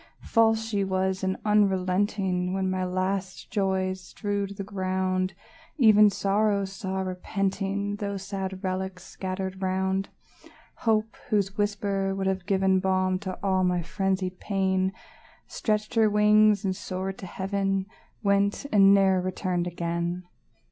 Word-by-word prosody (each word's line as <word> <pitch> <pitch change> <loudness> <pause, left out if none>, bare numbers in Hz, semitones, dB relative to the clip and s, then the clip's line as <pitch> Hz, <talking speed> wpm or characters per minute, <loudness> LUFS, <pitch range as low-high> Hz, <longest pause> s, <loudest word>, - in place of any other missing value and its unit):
False 225 -1 +3
she 205 -3 0
was, 190 0 -1
and 190 0 0
unrelenting; 190 -2 +1
When 190 -1 0
my 185 0 -1
last 185 +1 -2
joys 190 -2 0
strewed 200 +1 -4
the 195 - -3
ground, 185 -1 -1 0.4
Even 215 -5 +7
Sorrow 200 0 +1
saw, 190 -1 -4
repenting, 195 +2 -2
Those 200 -2 -4
sad 190 -1 -5
relics 185 -1 -3
scattered 190 0 -5
round; 190 +1 0 0.7
Hope, 220 -1 +1
whose 200 -3 +1
whisper 200 -2 -1
would 195 0 -2
have 190 -1 -1
given 190 -1 +3
Balm 185 -1 +1
to 190 -1 -5
all 190 -1 +2
my 180 -1 +1
frenzied 190 0 -2
pain, 190 -2 0 0.5
Stretched 215 0 -2
her 225 -2 +4
wings, 210 -1 +4
and 190 -1 0
soared 190 +1 -4
to 190 - -7
heaven, 195 0 -1 0.4
Went, 200 +4 +2
and 195 -1 +7
ne'er 190 -2 +4
returned 180 -1 -2
again! 170 +1 -2
190 Hz, 130 wpm, -27 LUFS, 185-200 Hz, 0.7 s, Even